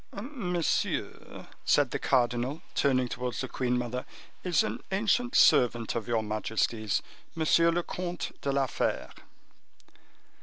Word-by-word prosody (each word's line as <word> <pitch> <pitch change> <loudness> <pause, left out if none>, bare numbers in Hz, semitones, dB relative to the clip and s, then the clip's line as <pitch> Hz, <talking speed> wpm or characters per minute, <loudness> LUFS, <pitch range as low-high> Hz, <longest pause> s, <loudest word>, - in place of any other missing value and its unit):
"Monsieur," 200 - -2 0.2
said - - +3
the - - -2
cardinal, 125 +4 +1
turning 130 -3 +2
towards 125 0 -4
the 130 - -2
queen 125 -1 -1
mother, 125 +1 -3 0.4
"is 180 +3 +3
an 215 - -3
ancient 225 +5 +1
servant 120 -2 +4
of 115 -1 -3
your 115 -2 +1
majesty's, 110 0 -1 0.3
Monsieur 165 +1 +4
le 175 +1 +1
Comte 180 0 -4
de 140 - 0
la 135 0 +2
Fere." - - -2
130 Hz, 125 wpm, -29 LUFS, 120-175 Hz, 0.4 s, servant